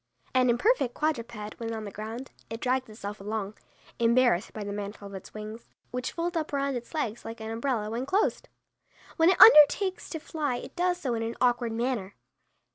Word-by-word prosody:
An 255 -1 +4
imperfect 250 - +2
quadruped 235 -8 -3
when 230 -1 -3
on 220 - -5
the 205 - -6
ground, 225 +6 -7 0.2
it 225 +1 -5
drags 255 0 0
itself 205 -1 -7
along, 210 0 -3 0.5
embarrassed 235 -4 +3
by 215 - -6
the 200 0 -4
mantle 205 0 -6
of 200 - -9
its 190 +2 -10
wings, 215 +2 -8 0.2
which 250 0 -3
fold 345 +1 -2
up 315 -2 -2
around 280 -1 0
its 245 +6 -7
legs 235 -7 -2
like 225 +1 -7
an 220 0 -5
umbrella 230 -2 -1
when 235 +4 -3
closed. 390 +7 0 0.7
When 325 +2 +5
it 375 - +2
undertakes 375 +1 +7
to 320 - -4
fly 295 -4 -2
it - - -8
does 355 0 +1
so 260 -8 -2
in 225 - -2
an 225 +1 -3
awkward 240 -2 +2
manner. 230 -4 -2
235 Hz, 195 wpm, -28 LUFS, 215-280 Hz, 0.7 s, undertakes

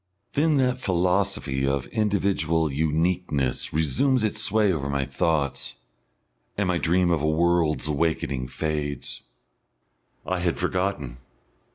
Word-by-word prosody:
Then 155 +1 +2
that 130 -2 +1
philosophy 90 - 0
of 70 -1 0
individual 95 -7 +1
uniqueness 80 -2 0
resumes 80 - +2
its 110 - +1
sway 105 -2 +3
over 70 -4 -3
my 70 -1 0
thoughts, 70 +1 -1 0.8
and 100 -2 +1
my 90 -1 +1
dream 85 +1 +2
of 80 -4 +1
a 75 - +1
world's 80 -1 +2
awakening 75 -4 -1
fades. 75 -1 -3 1.0
I 95 0 -1
had 85 -1 0
forgotten.... 90 -8 -2
85 Hz, 120 wpm, -25 LUFS, 75-95 Hz, 1.0 s, sway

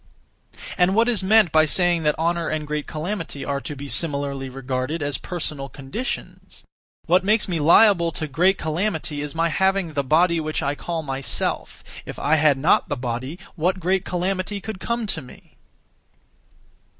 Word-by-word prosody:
And 180 +2 +4
what 230 +2 +4
is 230 -5 +2
meant 210 -2 +4
by 155 0 +5
saying 175 +1 +2
that 150 -1 +1
honour 170 +1 0
and 155 -1 -2
great 150 0 -3
calamity 160 -4 -4
are 140 -1 -2
to 150 - -5
be 140 +1 -7
(similarly) 140 -3 -1
regarded 130 +4 -3
as 145 -3 -1
personal 150 -6 -4
conditions? 145 - -6 0.4
What 180 +2 +3
makes 210 +3 +2
me 175 -4 -1
liable 170 +2 +5
to 155 - -3
great 175 +7 +2
calamity 160 -2 -2
is 150 +1 -6
my 165 +1 +1
having 190 0 +1
the 140 -1 0
body 165 +5 +3
(which 155 0 -2
I 140 0 0
call 165 +2 -4
myself); 135 -1 -3 0.2
if - - -8
I 150 +3 +2
had 145 -2 +4
not 150 +6 +2
the 145 - -2
body, 125 +5 -4 0.2
what 180 +3 0
great 185 +2 +1
calamity 185 +3 -2
could 210 -1 -7
come 235 +2 -2
to 165 -6 -3
me? 125 - -16
160 Hz, 170 wpm, -23 LUFS, 145-185 Hz, 0.4 s, by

